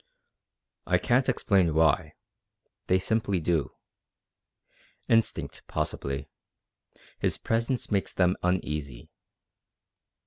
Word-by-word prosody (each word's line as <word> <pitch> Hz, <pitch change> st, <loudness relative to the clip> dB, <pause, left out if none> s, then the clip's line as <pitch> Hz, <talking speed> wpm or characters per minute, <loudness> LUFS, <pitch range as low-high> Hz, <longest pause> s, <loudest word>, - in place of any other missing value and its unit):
"I -, -, +4 dB
can't 130 Hz, +2 st, +2 dB
explain 95 Hz, -9 st, +2 dB
why; 80 Hz, 0 st, +2 dB, 0.7 s
they 95 Hz, -, +4 dB
simply 100 Hz, -1 st, 0 dB
do. 80 Hz, -2 st, -1 dB, 1.3 s
Instinct, 115 Hz, -1 st, +1 dB
possibly. 70 Hz, +2 st, -3 dB, 0.9 s
His -, -, 0 dB
presence 115 Hz, +2 st, -1 dB
makes 100 Hz, -2 st, 0 dB
them 90 Hz, 0 st, +2 dB
uneasy. 75 Hz, -8 st, -2 dB
90 Hz, 80 wpm, -28 LUFS, 80-115 Hz, 1.3 s, I